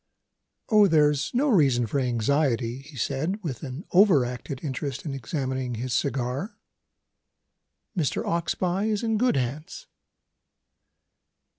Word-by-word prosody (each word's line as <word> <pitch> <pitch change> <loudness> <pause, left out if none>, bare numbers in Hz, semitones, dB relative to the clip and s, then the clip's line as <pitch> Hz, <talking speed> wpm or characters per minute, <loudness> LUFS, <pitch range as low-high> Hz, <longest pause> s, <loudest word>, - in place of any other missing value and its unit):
"Oh, 210 -2 +6
there's 150 -4 +3
no 265 +5 +1
reason 135 - +3
for 115 +6 -1
anxiety!" 125 0 0
he 140 +1 -13
said, 145 - -1
with 140 -8 -4
an 140 +3 -7
over 180 -9 +5
acted 125 +2 -6
interest 140 -1 -4
in 145 - -3
examining 130 -1 -3
his 125 +2 -3
cigar. 135 - -2 1.4
"Mr. 160 -7 -1
Oxbye 175 +4 0
is 215 +1 -1
in 225 -2 +1
good 250 +1 +3
hands." 135 +5 -4
140 Hz, 120 wpm, -26 LUFS, 125-175 Hz, 1.4 s, Oh